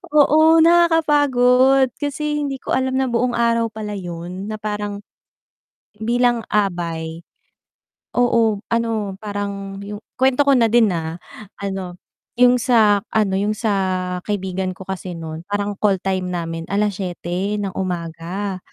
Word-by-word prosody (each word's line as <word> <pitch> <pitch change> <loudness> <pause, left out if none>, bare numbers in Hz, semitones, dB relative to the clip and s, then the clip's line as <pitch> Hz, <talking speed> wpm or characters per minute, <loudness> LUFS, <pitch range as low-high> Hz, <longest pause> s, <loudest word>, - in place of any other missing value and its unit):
Oo, 315 +2 +6
nakakapagod 285 -6 +4
kasi 295 +1 -2
hindi 270 -1 -4
ko - - -7
alam 260 0 0
na 265 - +1
buong 245 +1 +1
araw 230 -1 +2
pala 215 -1 -6
yun 180 +1 -6
na 215 - -4
parang, 210 -1 -4 1.0
bilang 240 +1 +2
abay 170 -5 -1 1.0
oo 230 -4 +3
ano, 225 -4 -1
parang 200 -1 -5
yung 205 +1 -6 0.2
kwento 265 +2 +4
ko 280 - +5
na 230 -2 +4
din 230 -1 +4
ah. 165 0 -3 0.4
Ano, 190 -3 -5 0.4
yung 250 0 +6
sa 220 -5 +4
ano, 210 -3 +1
yung 205 +2 0
sa 220 0 0 0.6
kaibigan 190 -2 -2
ko - - -8
kasi 185 -2 -5
nun 160 -1 -6
parang 205 0 -1
call 200 -2 +3
time 185 -1 -1
namin 165 -2 -4
7:00 195 -1 -2
ng 195 -2 -3
umaga. 180 +2 -4
205 Hz, 130 wpm, -20 LUFS, 190-245 Hz, 1.0 s, Oo